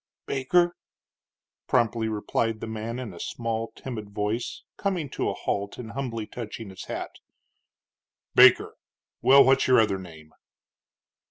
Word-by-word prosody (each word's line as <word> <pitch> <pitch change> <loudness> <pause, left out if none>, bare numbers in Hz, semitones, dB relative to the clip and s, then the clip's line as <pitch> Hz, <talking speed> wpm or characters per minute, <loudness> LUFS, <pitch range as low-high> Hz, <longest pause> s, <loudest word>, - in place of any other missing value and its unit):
"Baker," 175 +6 +2 0.9
promptly 115 -2 +2
replied 110 +1 -1
the - - -5
man, 110 +1 -5
in 125 -6 -6
a 85 - -11
small, 115 -1 -3
timid 110 -6 -7
voice, 105 +3 -3
coming 180 -8 -2
to - - -1
a - - -3
halt 100 0 -3
and 115 -2 -7
humbly 115 -5 -4
touching 115 -2 -7
his 95 - -9
hat. - - -5 1.2
"Baker? - - +7 0.5
Well, 140 +1 +8
what's 135 +1 +4
your 130 -2 +6
other 105 -3 +2
name?" 80 -4 -12
115 Hz, 135 wpm, -26 LUFS, 105-130 Hz, 1.2 s, Well